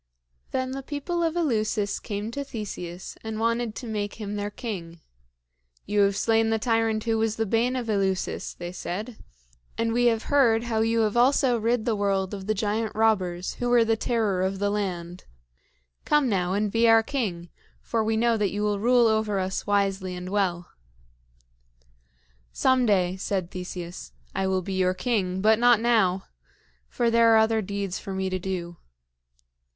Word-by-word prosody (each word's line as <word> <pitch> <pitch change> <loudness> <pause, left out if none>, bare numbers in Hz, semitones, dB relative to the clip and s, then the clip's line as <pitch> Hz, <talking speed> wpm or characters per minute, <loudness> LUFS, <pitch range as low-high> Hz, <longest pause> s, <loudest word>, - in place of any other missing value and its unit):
Then 260 0 -2
the 270 +1 -4
people 295 +5 -3
of 330 -1 0
Eleusis 215 -9 0
came 210 0 -4
to 280 +4 -4
Theseus 190 -8 -7
and 220 -1 -4
wanted 230 0 0
to - - -7
make 210 -2 -3
him 210 -2 -5
their 205 0 -2
king. 180 -7 -6 0.9
"You 210 - 0
have 200 0 +3
slain 225 0 +2
the 225 - +2
tyrant 225 -1 +1
who 225 -1 0
was 220 -1 0
the 225 - -1
bane 230 +5 +1
of 245 -2 -3
Eleusis," 195 -3 -1
they 175 0 -6
said, 210 +6 -5 0.6
"and 230 0 0
we 245 +1 +2
have 225 -2 +1
heard 235 -6 +3
how 230 -2 -1
you 225 +1 +2
have 215 -1 0
also 255 +1 +4
rid 230 0 0
the 230 -3 +1
world 195 -1 0
of 195 -1 -6
the 215 - +1
giant 215 +2 -1
robbers 190 -5 +1
who 245 - -1
were 240 -1 +5
the 225 0 +2
terror 220 -5 0
of 190 +1 -1
the 205 +1 0
land. 180 -4 -4 0.8
Come 295 -3 +3
now 185 -4 0
and 205 +1 0
be 230 +1 +3
our 225 0 +6
king; 195 -10 -3 0.3
for 225 -2 -1
we 220 0 0
know 230 0 +2
that 205 -2 +1
you 205 +2 -3
will 205 -1 0
rule 240 +2 +4
over 220 -2 +1
us 190 +1 -2
wisely 195 -2 0
and 180 0 -6
well." 185 -3 -1 1.8
"Some 260 -2 +2
day," 185 -3 +2
said 185 -2 -2
Theseus, 180 - -7 0.2
"I 190 - -1
will 190 -1 0
be 195 - -4
your 185 -1 +1
king, 190 -6 -1
but 220 +2 +4
not 240 -2 +5
now; 215 -6 +2 0.6
for 235 -1 0
there 230 -1 +5
are - - +7
other 220 0 +3
deeds 200 -2 -4
for 195 - -6
me 190 0 -2
to 185 - -1
do." 175 -2 -4
215 Hz, 180 wpm, -26 LUFS, 190-230 Hz, 1.8 s, are